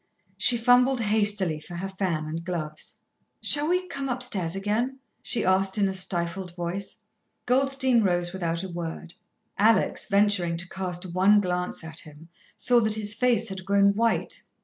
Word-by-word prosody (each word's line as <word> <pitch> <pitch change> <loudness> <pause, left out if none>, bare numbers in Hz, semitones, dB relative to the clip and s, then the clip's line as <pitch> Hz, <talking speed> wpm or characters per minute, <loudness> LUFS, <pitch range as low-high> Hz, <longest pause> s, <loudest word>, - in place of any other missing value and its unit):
She 240 - +3
fumbled 245 +2 +4
hastily 205 -6 +1
for 165 +3 -10
her 185 +3 -4
fan 185 -5 -2
and 160 +2 -5
gloves. 160 -4 -5 0.4
"Shall 290 +1 +2
we 365 +1 0
come 275 -4 -4
upstairs 215 -9 -2
again?" 215 +7 -1 0.2
she 240 - 0
asked 190 +2 +2
in 200 -1 +3
a 190 - -2
stifled 180 -1 0
voice. 180 +3 -4 0.5
Goldstein 260 -1 +2
rose 175 -3 0
without 170 -2 -2
a 190 - -6
word. 170 0 -6 0.5
Alex, 220 +2 +3
venturing 200 -5 +2
to 175 +1 -4
cast 180 -1 -5
one 195 +3 +5
glance 180 -3 -2
at 160 0 -5
him, 155 +1 -12 0.3
saw 245 -1 +4
that 220 -2 +1
his 210 -1 -2
face 235 -2 +1
had 190 -1 -6
grown 200 +1 +3
white. 230 +2 0
195 Hz, 160 wpm, -26 LUFS, 175-225 Hz, 0.5 s, one